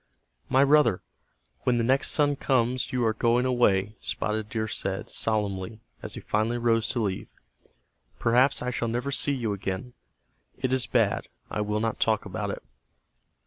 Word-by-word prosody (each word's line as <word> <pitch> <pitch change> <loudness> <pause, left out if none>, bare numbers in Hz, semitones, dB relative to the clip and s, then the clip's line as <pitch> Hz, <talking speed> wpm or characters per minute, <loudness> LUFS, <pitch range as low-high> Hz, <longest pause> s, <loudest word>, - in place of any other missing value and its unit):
"My 135 +2 +5
brother, 145 -9 +4 0.6
when 125 -1 +1
the 115 - +1
next 130 +4 +3
sun 145 -1 +3
comes 125 -2 0
you 125 -2 +1
are 110 - +2
going 120 +3 +2
away," 105 -5 +2
Spotted 105 0 -2
Deer 110 -1 -2
said, 95 -2 -3
solemnly, 105 -1 -2 0.2
as - - -6
he - - -7
finally 110 +3 0
rose 115 -1 +1
to 120 - -1
leave. 100 -4 -2 0.9
"Perhaps 125 +4 +3
I 125 - -1
shall 120 -1 -2
never 120 +4 -2
see 145 - +1
you 120 -6 -1
again. 100 +5 -4 0.6
It 130 -1 -1
is 130 -3 0
bad. 110 -5 +1 0.2
I 105 - -1
will 105 0 -1
not 115 -1 -1
talk 110 -1 +1
about - - -4
it." - - -5
115 Hz, 165 wpm, -27 LUFS, 105-125 Hz, 0.9 s, My